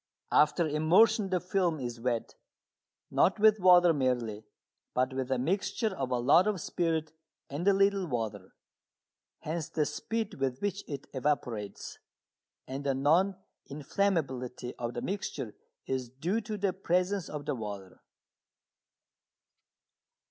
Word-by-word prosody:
After 155 Hz, +3 st, +4 dB
immersion 190 Hz, +8 st, +4 dB
the 185 Hz, -1 st, +1 dB
film 180 Hz, -3 st, 0 dB
is 120 Hz, -2 st, -5 dB
wet, 120 Hz, -1 st, -2 dB, 0.8 s
not 190 Hz, -, +3 dB
with 215 Hz, 0 st, +5 dB
water 180 Hz, -2 st, +7 dB
merely, 120 Hz, -6 st, -1 dB, 0.5 s
but 130 Hz, +1 st, +1 dB
with 130 Hz, -1 st, -3 dB
a 130 Hz, -, +1 dB
mixture 190 Hz, -, -1 dB
of 135 Hz, -5 st, -3 dB
a 125 Hz, -, +1 dB
lot 140 Hz, +10 st, +5 dB
of 210 Hz, -3 st, 0 dB
spirit 160 Hz, -1 st, -1 dB, 0.4 s
and 155 Hz, +7 st, -3 dB
a 200 Hz, -, +7 dB
little 195 Hz, -1 st, +2 dB
water. 110 Hz, -, -4 dB, 0.9 s
Hence 160 Hz, 0 st, -3 dB
the 150 Hz, -, 0 dB
speed 220 Hz, +9 st, -3 dB
with 130 Hz, -1 st, -1 dB
which 200 Hz, 0 st, -2 dB
it 140 Hz, -2 st, -6 dB
evaporates. 125 Hz, -7 st, -3 dB, 0.7 s
And 135 Hz, +2 st, -5 dB
the 135 Hz, -1 st, 0 dB
non 165 Hz, +8 st, +3 dB, 0.3 s
inflammability 140 Hz, -6 st, -2 dB
of 120 Hz, 0 st, -3 dB
the 120 Hz, -, -3 dB
mixture 140 Hz, -, -4 dB, 0.3 s
is 130 Hz, -2 st, -2 dB
due 170 Hz, -, -2 dB
to 215 Hz, 0 st, -5 dB
the 195 Hz, -2 st, 0 dB
presence 185 Hz, 0 st, 0 dB
of 145 Hz, -1 st, -6 dB
the 150 Hz, -, -1 dB
water. 100 Hz, -6 st, -7 dB
150 Hz, 135 wpm, -30 LUFS, 130-190 Hz, 0.9 s, water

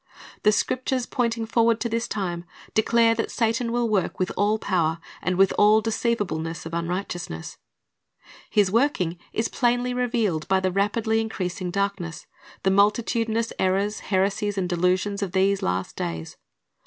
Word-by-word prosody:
The 210 Hz, -, +5 dB
Scriptures 255 Hz, +3 st, 0 dB
pointing 230 Hz, -2 st, -1 dB
forward 230 Hz, 0 st, +2 dB
to -, -, 0 dB
this 230 Hz, +1 st, -1 dB
time 175 Hz, -4 st, -3 dB, 0.3 s
declare 230 Hz, +1 st, +4 dB
that 225 Hz, 0 st, -2 dB
Satan 230 Hz, 0 st, 0 dB
will 240 Hz, 0 st, +1 dB
work 205 Hz, -5 st, 0 dB
with 185 Hz, -, -1 dB
all 210 Hz, +2 st, +2 dB
power 170 Hz, -6 st, 0 dB, 0.2 s
and 185 Hz, -, 0 dB
"with 195 Hz, 0 st, +4 dB
all 210 Hz, +1 st, +6 dB
deceivableness 205 Hz, -9 st, -2 dB
of 165 Hz, -, -7 dB
unrighteousness."^ 170 Hz, -, -4 dB, 0.9 s
His 205 Hz, -3 st, +3 dB
working 200 Hz, -, +1 dB
is 225 Hz, -, 0 dB
plainly 245 Hz, 0 st, +1 dB
revealed 230 Hz, -10 st, 0 dB
by 190 Hz, 0 st, +3 dB
the 185 Hz, 0 st, 0 dB
rapidly 220 Hz, +3 st, +1 dB
increasing 185 Hz, -4 st, -3 dB
darkness, 195 Hz, -4 st, -2 dB, 0.4 s
the 190 Hz, -, +3 dB
multitudinous 225 Hz, +3 st, +1 dB
errors, 195 Hz, +3 st, +1 dB
heresies, 200 Hz, +1 st, 0 dB
and 185 Hz, -2 st, 0 dB
delusions 185 Hz, +3 st, 0 dB
of 195 Hz, -3 st, -3 dB
these 195 Hz, +1 st, +2 dB
last 90 Hz, +1 st, -2 dB
days. 80 Hz, -1 st, -4 dB
205 Hz, 145 wpm, -24 LUFS, 180-230 Hz, 0.9 s, all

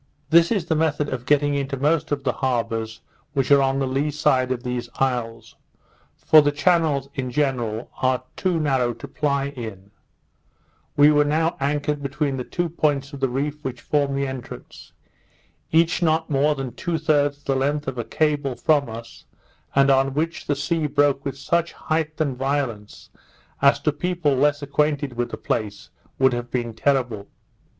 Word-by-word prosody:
This 170 Hz, +1 st, +6 dB
is 200 Hz, -8 st, 0 dB
the 160 Hz, -, 0 dB
method 150 Hz, -2 st, 0 dB
of 125 Hz, -1 st, -5 dB
getting 145 Hz, 0 st, +3 dB
into 140 Hz, -1 st, -2 dB
most 155 Hz, +3 st, +1 dB
of 140 Hz, -1 st, -1 dB
the 130 Hz, -2 st, 0 dB
harbours 115 Hz, -3 st, -2 dB, 0.3 s
which 135 Hz, -2 st, 0 dB
are 140 Hz, -1 st, +7 dB
on 135 Hz, 0 st, +1 dB
the 135 Hz, -, 0 dB
lee 135 Hz, +3 st, 0 dB
side 130 Hz, -3 st, +1 dB
of 125 Hz, -1 st, -2 dB
these 125 Hz, -1 st, -3 dB
isles; 120 Hz, -4 st, -2 dB, 0.6 s
for 155 Hz, -, +6 dB
the 145 Hz, 0 st, +2 dB
channels, 150 Hz, -3 st, +2 dB
in 135 Hz, -5 st, -3 dB
general, 125 Hz, -4 st, -1 dB
are 130 Hz, -1 st, +1 dB
too 185 Hz, -4 st, 0 dB
narrow 130 Hz, -5 st, +1 dB
to 115 Hz, +5 st, -9 dB
ply 140 Hz, -1 st, -1 dB
in: 110 Hz, -7 st, -8 dB, 1.1 s
We 145 Hz, +1 st, +7 dB
were 150 Hz, 0 st, +4 dB
now 160 Hz, +3 st, +1 dB
anchored 145 Hz, +1 st, -1 dB
between 140 Hz, 0 st, -2 dB
the 125 Hz, -, -3 dB
two 175 Hz, +6 st, -2 dB
points 145 Hz, -3 st, -1 dB
of 140 Hz, -, -7 dB
the 135 Hz, -1 st, +1 dB
reef 145 Hz, +4 st, -3 dB
which 125 Hz, -2 st, -4 dB
form 140 Hz, +1 st, 0 dB
the 140 Hz, 0 st, 0 dB
entrance; 130 Hz, -2 st, -9 dB, 0.8 s
each 165 Hz, +2 st, +3 dB
not 160 Hz, -1 st, +1 dB
more 145 Hz, +2 st, +2 dB
than 135 Hz, -3 st, -5 dB
two 170 Hz, +6 st, -2 dB
thirds 145 Hz, -3 st, +1 dB
the 135 Hz, -, 0 dB
length 145 Hz, +2 st, -1 dB
of 130 Hz, -2 st, -3 dB
a -, -, -1 dB
cable 145 Hz, -1 st, 0 dB
from 140 Hz, +1 st, +2 dB
us, 115 Hz, +1 st, -10 dB, 0.5 s
and 140 Hz, 0 st, +5 dB
on 135 Hz, 0 st, +2 dB
which 165 Hz, +3 st, -2 dB
the 145 Hz, -, +1 dB
sea 155 Hz, +2 st, -1 dB
broke 145 Hz, -1 st, +2 dB
with 135 Hz, -1 st, -4 dB
such 170 Hz, +4 st, 0 dB
height 155 Hz, 0 st, -2 dB
and 140 Hz, -5 st, -1 dB
violence, 130 Hz, -6 st, -3 dB, 0.5 s
as 140 Hz, 0 st, +5 dB
to 150 Hz, -, +2 dB
people 165 Hz, -1 st, 0 dB
less 145 Hz, +2 st, +2 dB
acquainted 145 Hz, -1 st, 0 dB
with 120 Hz, 0 st, -2 dB
the 110 Hz, -, -6 dB
place, 105 Hz, -2 st, -3 dB, 0.3 s
would 130 Hz, -1 st, +4 dB
have 120 Hz, 0 st, -4 dB
been 120 Hz, -2 st, -2 dB
terrible. 120 Hz, -4 st, 0 dB
140 Hz, 175 wpm, -23 LUFS, 130-150 Hz, 1.1 s, are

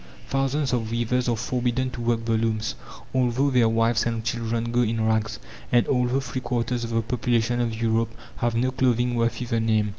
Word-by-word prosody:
Thousands 135 Hz, 0 st, 0 dB
of 115 Hz, -3 st, 0 dB
weavers 120 Hz, +2 st, 0 dB
are 120 Hz, -, +2 dB
forbidden 125 Hz, +2 st, -1 dB
to 120 Hz, -, -6 dB
work 115 Hz, -1 st, 0 dB
the 115 Hz, -, 0 dB
looms, 110 Hz, -1 st, 0 dB, 0.4 s
although 130 Hz, +2 st, +2 dB
their 120 Hz, -3 st, +4 dB
wives 115 Hz, 0 st, +2 dB
and 115 Hz, -1 st, -2 dB
children 115 Hz, 0 st, -1 dB
go 120 Hz, +1 st, +2 dB
in 115 Hz, -1 st, 0 dB
rags, 110 Hz, 0 st, 0 dB, 0.3 s
and 120 Hz, -1 st, +4 dB
although 125 Hz, 0 st, +2 dB
three 130 Hz, -1 st, -4 dB
quarters 120 Hz, -1 st, -1 dB
of 115 Hz, -, -3 dB
the 115 Hz, 0 st, 0 dB
population 120 Hz, 0 st, 0 dB
of 115 Hz, -2 st, -2 dB
Europe 115 Hz, 0 st, 0 dB, 0.2 s
have 120 Hz, -1 st, 0 dB
no 125 Hz, +3 st, +1 dB
clothing 125 Hz, -1 st, +1 dB
worthy 120 Hz, +1 st, 0 dB
the 115 Hz, -1 st, 0 dB
name. 110 Hz, -2 st, +2 dB
120 Hz, 190 wpm, -25 LUFS, 115-125 Hz, 0.4 s, their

